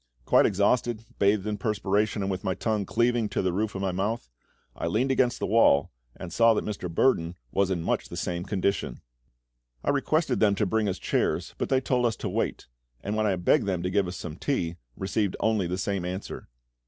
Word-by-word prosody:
Quite -, -, +5 dB
exhausted, 110 Hz, +3 st, +1 dB
bathed 100 Hz, 0 st, +3 dB
in 105 Hz, -1 st, -2 dB
perspiration, 105 Hz, -1 st, 0 dB
and 95 Hz, -, -1 dB
with 90 Hz, -1 st, -4 dB
my 95 Hz, -, -1 dB
tongue 105 Hz, -1 st, -1 dB
cleaving 120 Hz, -2 st, +1 dB
to 100 Hz, -, -1 dB
the 90 Hz, -1 st, 0 dB
roof 105 Hz, +2 st, -1 dB
of 95 Hz, -, -3 dB
my 95 Hz, -, 0 dB
mouth, 100 Hz, -, -2 dB, 0.4 s
I -, -, -3 dB
leaned 130 Hz, +5 st, +1 dB
against 125 Hz, -2 st, +2 dB
the -, -, -2 dB
wall, 100 Hz, -10 st, +4 dB, 0.2 s
and 90 Hz, -2 st, -8 dB
saw 115 Hz, +1 st, +5 dB
that -, -, -1 dB
Mr. 100 Hz, -4 st, -4 dB
Burdon 85 Hz, -2 st, +2 dB, 0.2 s
was 100 Hz, -1 st, +1 dB
in 90 Hz, -3 st, -1 dB
much -, -, -1 dB
the -, -, -7 dB
same 85 Hz, 0 st, -2 dB
condition. 95 Hz, -, -1 dB, 0.8 s
I -, -, +2 dB
requested 145 Hz, 0 st, +1 dB
them 105 Hz, -2 st, +4 dB
to 105 Hz, -, +1 dB
bring 105 Hz, +1 st, +1 dB
us 95 Hz, -, -2 dB
chairs, -, -, -1 dB
but -, -, -1 dB
they 130 Hz, -1 st, +3 dB
told 125 Hz, -2 st, +1 dB
us 110 Hz, -, -1 dB
to -, -, -4 dB
wait; -, -, -2 dB, 0.4 s
and 105 Hz, +2 st, -2 dB
when 110 Hz, 0 st, +1 dB
I 100 Hz, -, +2 dB
begged 90 Hz, +2 st, +2 dB
them 90 Hz, -3 st, -1 dB
to 90 Hz, -, -1 dB
give 100 Hz, -1 st, +2 dB
us 90 Hz, 0 st, -5 dB
some 80 Hz, -3 st, -7 dB
tea, 85 Hz, -, -1 dB, 0.2 s
received 100 Hz, 0 st, -1 dB
only 110 Hz, -5 st, +1 dB
the 90 Hz, +1 st, -2 dB
same 95 Hz, -1 st, -2 dB
answer. 90 Hz, -4 st, -6 dB
100 Hz, 215 wpm, -27 LUFS, 90-110 Hz, 0.8 s, Quite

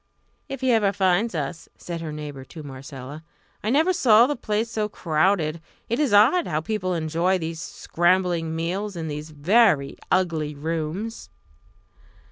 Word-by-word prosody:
"If 270 Hz, -1 st, -6 dB
he 260 Hz, -1 st, +2 dB
ever 215 Hz, -4 st, +3 dB
finds 190 Hz, +2 st, +1 dB
us!" 155 Hz, +2 st, -4 dB
said 170 Hz, -1 st, -6 dB
her 160 Hz, -2 st, -5 dB
neighbour 150 Hz, -3 st, -7 dB
to 155 Hz, +4 st, -11 dB
Marcella. 135 Hz, +2 st, -9 dB, 0.4 s
"I 215 Hz, -, -1 dB
never 315 Hz, +9 st, +3 dB
saw 235 Hz, -9 st, +6 dB
the 290 Hz, +3 st, -1 dB
place 215 Hz, -1 st, -1 dB
so 215 Hz, -2 st, -1 dB
crowded. 165 Hz, -2 st, +1 dB, 0.3 s
It 235 Hz, -, 0 dB
is 290 Hz, -6 st, +2 dB
odd 230 Hz, -, +5 dB
how 155 Hz, -2 st, 0 dB
people 185 Hz, +1 st, -2 dB
enjoy 170 Hz, +3 st, +1 dB
these 165 Hz, -1 st, -5 dB
scrambling 175 Hz, -2 st, 0 dB
meals 185 Hz, +5 st, -3 dB
in 165 Hz, -2 st, -4 dB
these 150 Hz, +1 st, -5 dB
very 155 Hz, -1 st, +3 dB
ugly 160 Hz, -5 st, +1 dB
rooms." 165 Hz, +8 st, -4 dB
175 Hz, 150 wpm, -24 LUFS, 155-215 Hz, 0.4 s, saw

